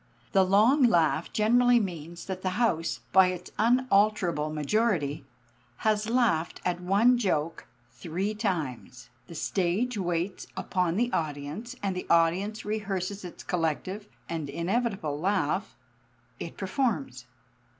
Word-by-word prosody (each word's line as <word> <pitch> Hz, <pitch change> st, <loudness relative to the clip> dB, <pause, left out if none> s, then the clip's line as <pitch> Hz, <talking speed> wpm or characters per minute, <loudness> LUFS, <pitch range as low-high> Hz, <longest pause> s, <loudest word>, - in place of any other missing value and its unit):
The 195 Hz, -2 st, +5 dB
long 215 Hz, +10 st, +4 dB
laugh 170 Hz, -, +3 dB
generally 245 Hz, +3 st, +4 dB
means 170 Hz, -4 st, -5 dB
that 190 Hz, -1 st, -5 dB
the 185 Hz, 0 st, -2 dB
house 175 Hz, -9 st, 0 dB
by 190 Hz, 0 st, +7 dB
its 180 Hz, 0 st, -5 dB
unalterable 210 Hz, -9 st, +2 dB
majority 155 Hz, -2 st, 0 dB, 0.6 s
has 215 Hz, 0 st, +2 dB
laughed 225 Hz, -10 st, +1 dB
at 180 Hz, -1 st, -1 dB
one 215 Hz, +7 st, +4 dB
joke 165 Hz, -7 st, -1 dB, 0.2 s
three 170 Hz, -, -3 dB
times. 130 Hz, -, -4 dB, 0.2 s
The 170 Hz, -, -10 dB
stage 200 Hz, +8 st, -1 dB
waits 175 Hz, +1 st, -2 dB
upon 180 Hz, -3 st, 0 dB
the 240 Hz, +2 st, +1 dB
audience, 155 Hz, -, -3 dB
and 195 Hz, -2 st, -1 dB
the 185 Hz, -, -5 dB
audience 180 Hz, +6 st, +2 dB
rehearses 200 Hz, -2 st, -3 dB
its 180 Hz, -, -9 dB
collective 180 Hz, +5 st, -2 dB, 0.2 s
and 160 Hz, -4 st, -4 dB
inevitable 175 Hz, -, -1 dB
laugh. 175 Hz, -, -1 dB, 0.6 s
It 165 Hz, -, -7 dB
performs. 185 Hz, -, -2 dB
185 Hz, 120 wpm, -28 LUFS, 165-215 Hz, 0.6 s, by